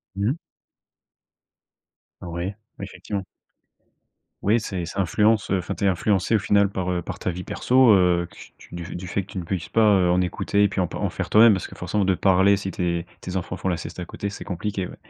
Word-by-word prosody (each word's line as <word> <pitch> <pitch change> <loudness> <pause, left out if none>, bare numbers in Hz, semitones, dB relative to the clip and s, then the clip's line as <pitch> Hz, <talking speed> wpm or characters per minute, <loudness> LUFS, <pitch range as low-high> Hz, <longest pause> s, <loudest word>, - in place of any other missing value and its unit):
Mmh. 110 +11 0 1.8
Oui, 85 +3 -4 0.3
effectivement. 100 -2 -5 1.2
Oui 110 +3 +2
c'est 90 -5 -4
ça 95 +4 -2
influence, 105 +4 +2
heu 95 - +3
enfin, 90 - -4
tu - - -6
es - - +4
influencée, 95 +3 +1
au - - +3
final, 100 -1 +3
par, 95 -2 -3
heu, 90 -1 -1
par - - -7
ta - - -2
vie 90 +1 -4
perso, 125 -2 +3
heu, 90 -2 +3
que - - -18 0.2
tu - - -16
du 85 +1 -6
fait 100 +2 -2
que 95 - -14
tu - - -6
ne 90 - -3
puisses 90 -1 -3
pas, 115 - +1
heu, 90 -2 +3
en 90 +1 +3
écouter 100 +3 0
et 100 - +4
puis 95 - -3
en 90 - +1
p - - -9
en - - -1
faire - - -5
toi-même. 110 +1 +7
Parce 95 - -3
que - - -13
forcément, 95 +3 -1
de 95 -1 +2
parler 95 +2 +4
si 95 -1 -4
tes 85 -1 -2
tes 90 +1 -6
enfants 90 0 -3
font - - -4
la 90 - +1
sieste 85 - -8
à 90 - -4
côté, 100 - -5
c'est 100 - -8
compliqué, 95 0 -3
ouais. - - -11
95 Hz, 225 wpm, -23 LUFS, 90-100 Hz, 1.8 s, toi-même